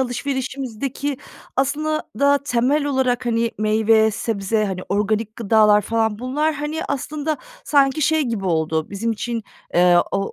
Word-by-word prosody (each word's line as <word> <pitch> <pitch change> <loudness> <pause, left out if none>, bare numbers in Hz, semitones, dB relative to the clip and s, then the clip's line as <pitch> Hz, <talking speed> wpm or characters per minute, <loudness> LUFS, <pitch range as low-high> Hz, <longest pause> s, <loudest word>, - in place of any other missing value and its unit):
alışverişimizdeki 265 +1 -3 0.4
aslında 305 +3 0 0.2
da 280 0 +4
temel 280 +2 +1
olarak, 255 -3 0
hani, 230 0 +1
meyve, 220 +1 +3
sebze, 215 0 -1
hani, 190 -2 -3
organik 215 +2 -1
gıdalar 215 -1 +4
falan 220 0 0
bunlar, 295 +6 0
hani, 295 +2 -3
aslında 295 +2 -2 0.3
sanki 280 0 +3
şey 315 +2 +3
gibi 230 -7 -3
oldu, 160 -2 0
bizim 220 +3 -1
için, 230 +1 -3 0.3
eee, 175 0 +5 0.2
o 195 - -1
235 Hz, 135 wpm, -21 LUFS, 215-280 Hz, 0.4 s, eee